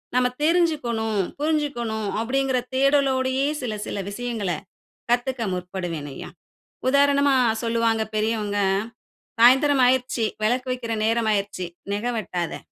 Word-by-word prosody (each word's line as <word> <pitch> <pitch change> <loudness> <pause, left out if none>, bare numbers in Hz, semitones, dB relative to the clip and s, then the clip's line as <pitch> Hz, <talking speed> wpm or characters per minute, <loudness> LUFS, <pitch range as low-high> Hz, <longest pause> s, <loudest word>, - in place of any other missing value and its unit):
நம்ம 250 0 +4 0.2
தெருஞ்சுக்கனு, 310 -9 +1 0.3
புருஞ்சுக்கனு 290 -7 -1 0.2
அப்படிங்கிற 265 +2 0 0.2
தேடலோடையே 270 -1 +2
சில 240 -4 -3
சில 200 - -3
விஷயங்கள 225 -3 -3 0.6
கத்துக்க 245 +1 0
முற்படுவேன் 180 -5 -4
ஐயா. - - -8 0.6
உதாரணமா 280 0 +4 0.3
சொல்லுவாங்க 230 -1 +1
பெரியவங்க 215 -1 0 0.8
சாயந்திரம் 265 +3 +6
ஆகிருச்சு 250 -2 +1 0.2
விளக்கு 250 +4 +1
வக்கிற 245 -2 -4
நேர 225 +1 +2
ஆகிருச்சு. 200 -3 -1 0.3
நெக 205 +3 -2
வெட்டாதே 175 -5 -3
245 Hz, 105 wpm, -24 LUFS, 215-270 Hz, 0.8 s, சாயந்திரம்